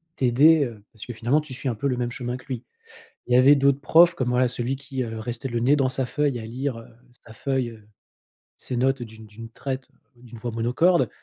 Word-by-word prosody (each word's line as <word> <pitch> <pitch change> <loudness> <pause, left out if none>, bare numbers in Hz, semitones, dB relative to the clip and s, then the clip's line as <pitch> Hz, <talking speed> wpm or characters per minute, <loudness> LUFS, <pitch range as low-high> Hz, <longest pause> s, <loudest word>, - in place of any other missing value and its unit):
t'aider, 140 +4 +4
heu, 110 -4 -9
parce 110 +1 -11
que, 120 - -5
finalement, 120 +7 +1
tu 150 -4 -8
suis 130 - -5
un 120 - 0
peu 140 +6 -2
le 125 - -1
même 120 -1 -2
chemin 125 0 -4
que - - -17
lui. 125 -3 -5 0.6
Il 125 - 0
y 125 - +7
avait 135 +3 +7
d'autres 140 0 +2
profs 170 +3 +5
comme, 125 -4 -1
voilà, 125 +1 +3
celui 125 +2 -3
qui, 135 -1 -4
heu, 110 -1 -6
restait 120 +3 -5
le 120 -2 -2
nez 130 +5 +4
dans 135 -3 +1
sa 130 -1 -2
feuille 145 -4 -1
à 110 - -7
lire, 125 +1 -4
heu, 115 - -13 0.2
sa 115 -2 -16
feuille, 130 0 -2
heu, 110 -2 -15 0.7
ses 125 - -5
notes 130 0 +1
d'une 110 -1 -12
d'une 110 +2 -11
traite, 130 +3 -6 0.3
d'une 120 -1 -13
voix 120 +1 -5
monocorde. 125 +11 +2
125 Hz, 235 wpm, -24 LUFS, 115-135 Hz, 0.7 s, y